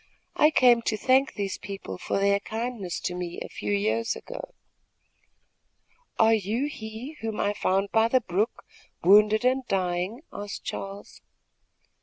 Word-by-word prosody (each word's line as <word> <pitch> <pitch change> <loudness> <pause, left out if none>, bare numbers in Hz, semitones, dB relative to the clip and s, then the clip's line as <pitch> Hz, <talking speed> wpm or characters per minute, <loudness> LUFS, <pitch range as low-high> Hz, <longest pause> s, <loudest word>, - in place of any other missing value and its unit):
I 300 - +6
came 245 -5 +5
to 215 - -1
thank 265 +4 +3
these 200 -2 -3
people 195 - -7
for - - -2
their 200 0 +3
kindness 220 -4 -4
to 180 - -2
me 180 -1 -5
a - - -5
few - - -5
years 215 +3 +1
ago." - - -9 1.6
"Are 225 0 +5
you 220 +5 0
he 240 +2 -7
whom 225 -1 -3
I 205 - +1
found 195 0 0
by 225 0 +4
the 255 +2 +3
brook, 205 +3 -1 0.4
wounded 210 +4 +6
and 260 +1 +3
dying?" 185 - -1
asked 205 0 -6
Charles. 195 +1 -7
215 Hz, 145 wpm, -26 LUFS, 195-240 Hz, 1.6 s, I